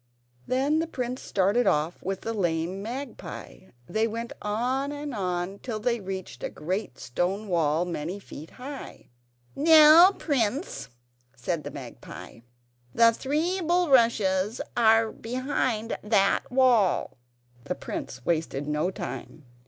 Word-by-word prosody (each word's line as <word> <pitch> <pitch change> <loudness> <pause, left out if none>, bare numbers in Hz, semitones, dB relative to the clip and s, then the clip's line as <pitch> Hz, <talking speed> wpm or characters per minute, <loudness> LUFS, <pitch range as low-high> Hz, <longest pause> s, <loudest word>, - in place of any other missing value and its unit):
Then 275 +5 +2
the 330 - -1
prince 255 -4 -4
started 205 +6 +1
off 150 +3 +1
with 195 0 -3
the 225 - -3
lame 175 -1 -1
magpie. 240 -3 -7 0.2
They 220 +1 +1
went 230 +1 -5
on 250 +7 -1
and 290 -1 -5
on 185 -1 -2
till 225 -4 -4
they 235 +1 0
reached 190 - -6
a - - -2
great 185 - -4
stone 185 - -2
wall, 165 -2 +1
many, 170 -1 -4
many 200 - -7
feet 160 -5 -10
high. 270 +2 -9 0.5
"Now, 315 +4 +8
prince," 275 - -2 0.5
said 155 +6 -3
the 145 - -5
magpie, 125 - -10 0.6
"the 230 0 +6
three 315 +10 -1
bulrushes 235 - +3 0.2
are 225 -1 +4
behind 245 -2 -2
that 205 0 +2
wall." 245 - +3 0.5
The - - -2
prince - - -6
wasted 155 -4 -1
no 150 +4 0
time. 160 -5 -7
220 Hz, 130 wpm, -27 LUFS, 180-260 Hz, 0.6 s, Now